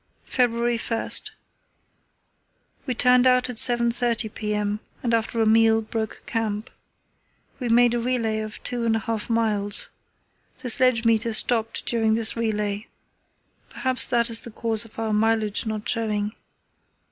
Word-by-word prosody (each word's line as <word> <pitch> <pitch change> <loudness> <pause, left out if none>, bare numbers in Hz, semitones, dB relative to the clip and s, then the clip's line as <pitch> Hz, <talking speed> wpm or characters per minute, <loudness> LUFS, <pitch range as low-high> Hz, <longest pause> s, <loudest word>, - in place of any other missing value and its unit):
"February 240 -1 0 2.1
1.—We 255 - -2
turned 250 +1 +4
out 250 0 +2
at 240 - -8
7.30 235 -2 +3
p.m., 210 -1 -2 0.2
and 235 -2 -1
after 230 0 -1
a 225 - +3
meal 225 0 +4
broke 220 0 -5
camp. 220 0 -3 0.9
We 245 -3 -3
made 240 +1 +4
a 240 - 0
relay 230 -3 -1
of 215 -1 -7
two 245 -1 -2
and 225 -1 +1
a - - 0
half 225 +1 -4
miles. 210 -3 -1 0.7
The 250 - 0
sledge 255 -1 +3
meter 230 0 +1
stopped 225 0 +1
during 225 -2 +1
this 225 -1 0
relay. 210 -2 -2 0.8
Perhaps 260 -1 0
that 235 -1 +1
is 225 - +4
the - - -10
cause 225 0 -1
of 225 - -18
our 220 -1 -2
mileage 220 0 +1
not 215 -1 -4
showing. 215 -2 -2
225 Hz, 140 wpm, -23 LUFS, 220-235 Hz, 2.1 s, turned